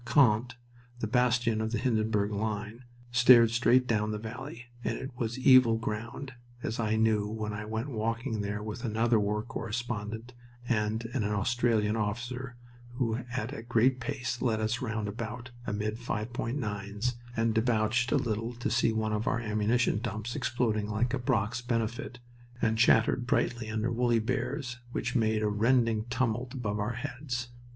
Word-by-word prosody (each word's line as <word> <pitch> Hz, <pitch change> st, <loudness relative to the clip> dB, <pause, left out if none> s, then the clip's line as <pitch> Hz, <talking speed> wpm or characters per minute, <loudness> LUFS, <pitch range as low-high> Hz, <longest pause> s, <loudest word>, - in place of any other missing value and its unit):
Queant, 120 Hz, -1 st, +3 dB, 0.4 s
the 120 Hz, -, -2 dB
bastion 120 Hz, -1 st, +2 dB
of 110 Hz, 0 st, -2 dB
the 115 Hz, -, 0 dB
Hindenburg 110 Hz, -3 st, +1 dB
line, 105 Hz, +3 st, -3 dB, 0.3 s
stared 120 Hz, -1 st, +7 dB
straight 125 Hz, +2 st, +4 dB
down 105 Hz, -3 st, +1 dB
the 105 Hz, -, -2 dB
valley, 120 Hz, +3 st, -7 dB, 0.2 s
and -, -, -1 dB
it 130 Hz, -, -6 dB
was 120 Hz, -1 st, -2 dB
evil 130 Hz, -3 st, +6 dB
ground, 115 Hz, +4 st, -5 dB, 0.3 s
as 110 Hz, -, -3 dB
I 110 Hz, -1 st, +1 dB
knew 110 Hz, -2 st, +2 dB
when 105 Hz, 0 st, -4 dB
I 105 Hz, 0 st, -5 dB
went 110 Hz, +6 st, -3 dB
walking 115 Hz, 0 st, -1 dB
there 100 Hz, +1 st, -3 dB
with 110 Hz, +3 st, -6 dB
another 115 Hz, 0 st, +2 dB
war 105 Hz, +1 st, 0 dB
correspondent 115 Hz, 0 st, -4 dB, 0.3 s
and 110 Hz, 0 st, 0 dB
an 130 Hz, -6 st, 0 dB
Australian 105 Hz, +1 st, +1 dB
officer 120 Hz, +4 st, -3 dB, 0.4 s
who 120 Hz, -3 st, 0 dB
at 125 Hz, +1 st, -3 dB
a 125 Hz, -, -6 dB
great 120 Hz, +2 st, +2 dB
pace 125 Hz, -2 st, -3 dB
led 115 Hz, -4 st, +1 dB
us 110 Hz, +4 st, -1 dB
round 110 Hz, -4 st, -2 dB
about, 115 Hz, +3 st, -5 dB, 0.2 s
amid 105 Hz, +2 st, -2 dB
5.9's, 115 Hz, -2 st, -3 dB, 0.2 s
and 115 Hz, 0 st, +2 dB
debouched 115 Hz, +2 st, +2 dB
a 150 Hz, -, +4 dB
little 115 Hz, -2 st, -1 dB
to 120 Hz, -, -2 dB
see 120 Hz, -2 st, +3 dB
one 110 Hz, -1 st, -1 dB
of 105 Hz, +2 st, -1 dB
our 115 Hz, -, +1 dB
ammunition 110 Hz, 0 st, +1 dB
dumps 110 Hz, +1 st, -4 dB
exploding 115 Hz, -6 st, 0 dB
like 115 Hz, +4 st, 0 dB
a 135 Hz, -, 0 dB
Brock's 120 Hz, -2 st, 0 dB
Benefit, 115 Hz, -1 st, -2 dB, 0.4 s
and 110 Hz, -2 st, +2 dB
chattered 120 Hz, +1 st, +4 dB
brightly 120 Hz, -2 st, 0 dB
under 110 Hz, +2 st, -1 dB
"woolly 120 Hz, 0 st, +2 dB
bears" 125 Hz, +2 st, -2 dB
which -, -, -2 dB
made 110 Hz, -2 st, +2 dB
a -, -, +2 dB
rending 115 Hz, +1 st, +2 dB
tumult 120 Hz, +1 st, -1 dB
above 105 Hz, -4 st, -2 dB
our 105 Hz, +3 st, -1 dB
heads. 125 Hz, -1 st, -4 dB
115 Hz, 160 wpm, -30 LUFS, 110-125 Hz, 0.4 s, stared